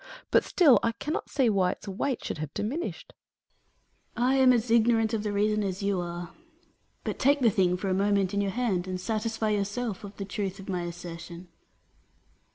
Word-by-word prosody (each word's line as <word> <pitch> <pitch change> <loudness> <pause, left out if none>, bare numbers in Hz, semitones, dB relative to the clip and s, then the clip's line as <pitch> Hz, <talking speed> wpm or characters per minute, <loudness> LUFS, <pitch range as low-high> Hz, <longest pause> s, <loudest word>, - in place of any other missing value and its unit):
But - - +5
still 305 -9 +5
I 230 - 0
cannot 300 +7 -4
see 270 -4 +2
why 190 -4 +2
its - - -15
weight 235 +7 -2
should - - -4
have 155 -2 -4
diminished. 330 - -4 1.0
Atlas. 245 +1 +2
I - - +3
am 260 -1 +6
as 240 -1 +1
ignorant 225 -1 +3
of 220 - 0
the 210 -1 -2
reason 210 +1 +1
as 195 0 -3
you 200 -2 +1
are. 175 0 -6 0.7
But - - -4
take 285 +1 +3
the 235 -3 +5
thing 180 -2 +2
for 195 - -4
a 190 - +1
moment 200 0 +1
in 200 - +1
your 200 - 0
hand, 195 -5 -1
and 185 0 -3
satisfy 220 +2 -1
yourself 210 +1 -2
of 200 0 -9
the 195 - -4
truth 195 -1 -4
of 195 - -10
my 180 -3 -2
assertion. 170 0 -8
205 Hz, 195 wpm, -28 LUFS, 185-230 Hz, 1.0 s, am